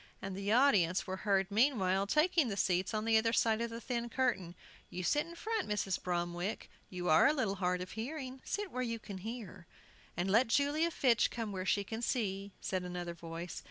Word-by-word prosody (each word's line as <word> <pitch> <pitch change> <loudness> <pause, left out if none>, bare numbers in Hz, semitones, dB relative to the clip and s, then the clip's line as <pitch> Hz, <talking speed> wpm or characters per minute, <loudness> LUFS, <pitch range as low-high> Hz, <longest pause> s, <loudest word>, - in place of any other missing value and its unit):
And 195 -1 -5
the 200 +1 -2
audience 210 -9 +4
were 190 0 -4
heard 195 0 +1
meanwhile 200 -5 +2
taking 310 - +3
the 200 - -3
seats 185 -1 +1
on 215 -1 -2
the 225 -1 +5
other 225 +1 +1
side 225 -1 +2
of 235 - -1
the 230 0 -6
thin 240 -1 -3
curtain. 225 -9 -1 0.3
"You 180 - -5
sit 295 - +1
in 340 - -10
front, 440 - -2
Mrs. 200 -3 -1
Bromwick; 175 +3 -3 0.2
you 180 -1 -4
are 155 +8 +6
a 290 - +4
little 220 -9 -1
hard 180 -1 0
of 180 - -6
hearing; 260 +2 -5
sit 410 -1 -3
where 255 - -3
you 230 -2 -2
can 200 -3 -8
hear." 200 -5 -7 0.5
"And 180 +2 0
let 230 +5 +5
Julia 290 +7 +2
Fitch 245 -9 +3
come 225 -3 -4
where 185 -1 -4
she 200 - +2
can 225 +3 -5
see," 200 -5 -1
said 185 -1 -2
another 175 -1 -4
voice. 170 0 -7
210 Hz, 205 wpm, -34 LUFS, 185-250 Hz, 0.5 s, are